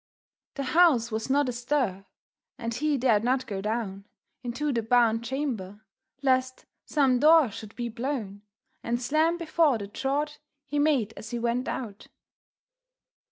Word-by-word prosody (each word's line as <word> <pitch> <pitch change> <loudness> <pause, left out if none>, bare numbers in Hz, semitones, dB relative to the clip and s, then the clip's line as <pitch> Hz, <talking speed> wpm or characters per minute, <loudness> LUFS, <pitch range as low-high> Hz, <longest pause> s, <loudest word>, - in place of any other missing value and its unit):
The 275 - -3
house 270 -5 +4
was 220 +3 -3
not 285 +1 +3
astir, 240 -5 -1 0.5
and 230 -1 -4
he 295 +4 0
dared 230 -5 +3
not 255 +2 +1
go 200 -5 -4
down 205 -2 -3 0.4
Into 260 +4 -2
the 230 - 0
barn 225 0 +3
chamber, 235 -6 -4 0.4
lest 255 -1 +1 0.2
some 270 -4 +3
door 305 -4 +6
should 215 +1 -10
be 240 -1 -3
blown 230 -4 -4 0.4
And 235 +1 -1
slam 310 +7 +1
before 320 -5 +2
the 205 - -6
draught 280 +8 -2 0.3
he 290 +1 -2
made 275 -8 +2
as 220 - -9
he 240 - -3
went 235 +2 -1
out. 215 -5 -5
245 Hz, 145 wpm, -27 LUFS, 225-285 Hz, 0.5 s, door